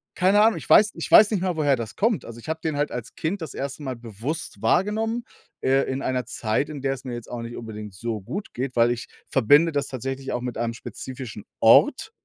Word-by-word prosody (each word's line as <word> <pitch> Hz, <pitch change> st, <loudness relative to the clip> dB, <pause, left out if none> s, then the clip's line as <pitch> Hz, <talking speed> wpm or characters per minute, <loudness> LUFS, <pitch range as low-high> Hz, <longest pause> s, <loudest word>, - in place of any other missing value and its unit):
keine 195 Hz, +3 st, +4 dB
Ahnung. 220 Hz, +1 st, +4 dB
Ich -, -, -8 dB
weiß 210 Hz, 0 st, +7 dB
ich -, -, -5 dB
weiß 210 Hz, 0 st, +8 dB
nicht 205 Hz, -5 st, 0 dB
mal, 180 Hz, -2 st, 0 dB
woher 145 Hz, -3 st, +3 dB
das 110 Hz, -2 st, -6 dB
kommt, 225 Hz, -1 st, +1 dB
also 115 Hz, 0 st, -9 dB
ich 120 Hz, -, -10 dB
habe 160 Hz, 0 st, -2 dB
den 160 Hz, -2 st, -2 dB
halt 145 Hz, 0 st, 0 dB
als 120 Hz, -3 st, -6 dB
Kind 175 Hz, +5 st, -2 dB
das 160 Hz, -, -6 dB
1. 140 Hz, +2 st, -5 dB
Mal 130 Hz, -2 st, -3 dB
bewusst 115 Hz, +1 st, -6 dB
wahrgenommen, 220 Hz, -, +1 dB, 0.4 s
äh, 135 Hz, +1 st, +3 dB
in 130 Hz, +1 st, -3 dB
einer 125 Hz, -1 st, -1 dB
Zeit, 115 Hz, +3 st, -1 dB
in 145 Hz, -3 st, -6 dB
der 135 Hz, 0 st, 0 dB
es 135 Hz, -, -13 dB
mir 125 Hz, -, -4 dB
jetzt 120 Hz, -1 st, -7 dB
auch 120 Hz, -, -4 dB
nicht 115 Hz, +1 st, -7 dB
unbedingt 105 Hz, -3 st, -7 dB
so 110 Hz, +3 st, -4 dB
gut 185 Hz, -, -6 dB
geht, 125 Hz, +1 st, -3 dB
weil 120 Hz, 0 st, +4 dB
ich 120 Hz, 0 st, -4 dB, 0.2 s
verbinde 145 Hz, +6 st, +5 dB
das 145 Hz, -2 st, -1 dB
tatsächlich 135 Hz, +1 st, -4 dB
auch 120 Hz, -, -2 dB
mit 125 Hz, -1 st, -4 dB
einem 115 Hz, 0 st, -1 dB
spezifischen 120 Hz, -2 st, -8 dB, 0.2 s
Ort -, -, +5 dB
135 Hz, 235 wpm, -24 LUFS, 115-160 Hz, 0.4 s, weiß